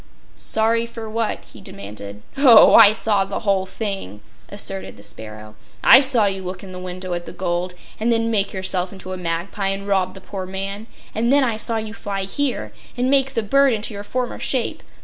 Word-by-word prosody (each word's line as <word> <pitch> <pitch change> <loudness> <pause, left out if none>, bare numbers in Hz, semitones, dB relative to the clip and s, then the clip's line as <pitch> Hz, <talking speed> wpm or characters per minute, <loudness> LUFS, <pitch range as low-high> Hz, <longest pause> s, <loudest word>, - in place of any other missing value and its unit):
"Sorry 230 +1 +1
for 230 -1 -8
what?" 220 0 -2
he - - -12
demanded. 100 0 -9
"Oh, 260 -5 +8
I 205 - +9
saw 215 -2 +1
the 195 0 -5
whole 195 -3 +1
thing," 195 - -4 0.3
asserted 95 0 -4
the 100 - -14
sparrow. 110 -1 -9 0.3
"I 260 - +9
saw 255 -6 +3
you 195 -1 -1
look 185 +1 -6
in 190 - -9
the 180 - -7
window 185 0 -5
at 175 0 -4
the - - -6
gold, 180 0 -2 0.2
and 230 +2 +1
then 230 0 +1
make 200 -3 +1
yourself 185 -2 -2
into 185 -1 -8
a - - -5
magpie 180 +3 -3
and 195 +1 -2
rob 190 -2 0
the - - -9
poor 190 0 -7
man, 195 +3 -5 0.3
and 230 +3 +1
then 285 0 +5
I 230 -4 0
saw 225 +1 0
you 220 -1 -5
fly 200 -3 -4
here 195 - -2 0.2
and 250 +2 +1
make 270 -1 +2
the 230 - 0
bird 275 +4 +4
into 215 0 -2
your 200 0 -6
former 250 +3 -3
shape. 255 -4 -1
200 Hz, 205 wpm, -21 LUFS, 185-230 Hz, 0.3 s, I